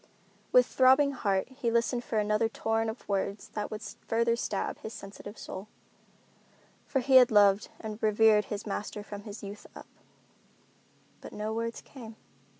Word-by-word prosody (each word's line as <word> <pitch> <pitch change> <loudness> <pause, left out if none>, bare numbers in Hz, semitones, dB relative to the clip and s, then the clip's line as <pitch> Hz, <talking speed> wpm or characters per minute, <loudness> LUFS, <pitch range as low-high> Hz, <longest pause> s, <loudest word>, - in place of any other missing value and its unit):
With - - +6
throbbing 265 +2 +4
heart 200 -7 0
he 260 -2 -2
listened 235 +1 +1
for 220 - -3
another 210 +1 +2
torrent 225 0 -1
of 220 - -8
words 200 0 -2
that 210 -1 -4
would 215 0 -6
still - - -9
further 230 +1 +2
stab 235 - -3
his 220 - -7
sensitive 205 +1 -10
soul; 190 +3 -8 1.2
for 270 - 0
he 260 +1 +6
had 250 -2 +7
loved 205 -1 +4
and 215 -1 -7
revered 215 -1 +4
his 205 +1 -5
master 210 0 -4
from 205 0 -9
his 210 0 -8
youth 200 +1 -8
up. - - -10 1.4
But - - -10
no 215 +1 -3
words 230 +1 -3
came. 230 -5 -11
220 Hz, 160 wpm, -29 LUFS, 205-235 Hz, 1.4 s, had